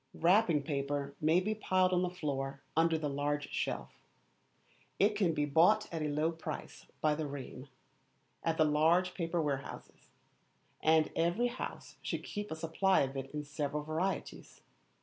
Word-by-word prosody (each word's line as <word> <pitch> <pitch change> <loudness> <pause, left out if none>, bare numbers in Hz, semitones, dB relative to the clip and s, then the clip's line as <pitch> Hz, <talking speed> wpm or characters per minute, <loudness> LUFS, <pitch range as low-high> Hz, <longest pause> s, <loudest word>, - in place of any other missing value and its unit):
Wrapping 175 -4 +4
paper 140 -1 -2
may 160 +3 +4
be 210 +4 -1
piled 185 -3 +2
on 180 - +3
the 180 - 0
floor 140 -5 -4
under 165 0 +3
the 155 -2 -2
large 145 +1 -2
shelf. - - -2 1.1
It 205 +1 +3
can 195 -5 +2
be 150 -1 +1
bought 175 +9 +4
at 165 - -2
a 155 - 0
low 150 +3 +1
price 165 -1 -7
by 155 -1 +3
the 150 0 -2
ream, 140 -1 -7 0.8
at 165 -1 0
the 155 - +5
large 165 +5 +3
paper 170 -1 -1
warehouses; 140 -4 -4 0.7
and 160 0 +4
every 175 +9 +2
house 245 - -7
should - - -3
keep 205 -1 -5
a 160 - -3
supply 165 +4 +2
of 135 0 -1
it 135 0 -4
in 150 +1 -4
several 150 0 -3
varieties. 160 +5 -3
160 Hz, 160 wpm, -33 LUFS, 145-180 Hz, 1.1 s, the